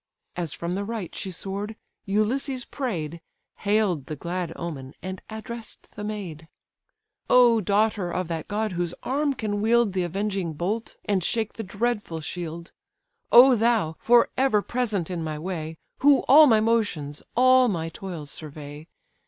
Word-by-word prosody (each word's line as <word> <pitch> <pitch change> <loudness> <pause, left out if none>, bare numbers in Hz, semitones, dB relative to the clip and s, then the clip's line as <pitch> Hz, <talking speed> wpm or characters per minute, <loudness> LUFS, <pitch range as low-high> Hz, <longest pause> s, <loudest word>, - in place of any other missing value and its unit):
As 170 -4 -3
from 170 +3 -4
the 200 +2 -2
right 215 -4 -5
she 195 - -5
soar'd, 200 +4 -5 0.3
Ulysses 245 +6 0
pray'd, 170 - -4 0.4
Hail'd 200 -8 +1
the 155 - -4
glad 170 +3 -4
omen, 140 -5 -6
and 185 0 -5
address'd 225 +1 -8
the 210 - -8
maid: 185 -7 -6 0.8
"O 240 -3 +6
daughter 205 -1 +1
of 180 0 -2
that 165 -2 -4
god 215 0 -1
whose 175 -1 -2
arm 280 +1 0
can 205 -3 -2
wield 230 -2 +3
The 185 - 0
avenging 190 -1 -2
bolt, 200 +9 -3
and 195 -3 +1
shake 225 +3 -1
the 225 -4 -7
saber 210 -6 -1
shield! 170 +1 -6 0.6
O 250 +2 +9
thou! 225 -8 +2
for 240 0 +4
ever 260 -6 +3
present 215 -8 -1
in 170 -2 -3
my 155 -1 -3
way, 160 -1 -5 0.2
Who 280 0 +5
all 300 +2 +9
my 220 -4 +5
motions, 205 -11 0
all 255 +1 +6
my 165 -6 -2
toils 165 -5 -7
survey! 150 0 -7
200 Hz, 155 wpm, -25 LUFS, 170-230 Hz, 0.8 s, O